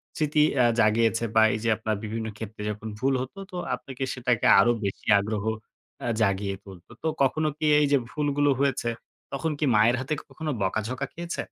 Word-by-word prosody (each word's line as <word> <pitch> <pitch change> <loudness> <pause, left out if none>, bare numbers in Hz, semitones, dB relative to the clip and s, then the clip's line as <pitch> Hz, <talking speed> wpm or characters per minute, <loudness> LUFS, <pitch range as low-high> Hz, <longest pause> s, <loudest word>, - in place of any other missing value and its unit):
স্মৃতি 150 -1 +2 0.2
আ - - +5
জাগিয়েছে 115 +1 +3
বা 110 - +7
এই 110 - -2
যে, 115 - +1
আপনার 110 -1 -2
বিভিন্ন 110 +1 -4
ক্ষেত্রে 110 -1 -8
যখন 105 +1 -5
ভুল 135 +2 +1
হত 130 +8 -7 0.2
তো 180 - -6 0.2
আপনাকে 135 0 -7
সেটাকে 125 -2 0
আরো 120 +4 +5
বেশি 100 - -5
আগ্রহ 105 +1 -3 0.5
অ্যা 120 - -3
জাগিয়ে 100 -1 +1
তুলত। 95 -3 -13 0.2
তো - - 0 0.2
কখনো 155 +4 +1
কি 155 - -2
এই 150 - +4
যে, 140 - +6
ভুলগুলো 145 -1 +1
হয়েছে, 135 -4 +1 0.4
তখন 155 +3 -1
কি 150 - +1
মায়ের 110 +3 +5
হাতে 130 +4 -2 0.2
কখনো 155 -1 -4
বকাঝকা 110 +7 -1
খেয়েছে? 170 +1 -4
120 Hz, 180 wpm, -26 LUFS, 110-145 Hz, 0.5 s, বা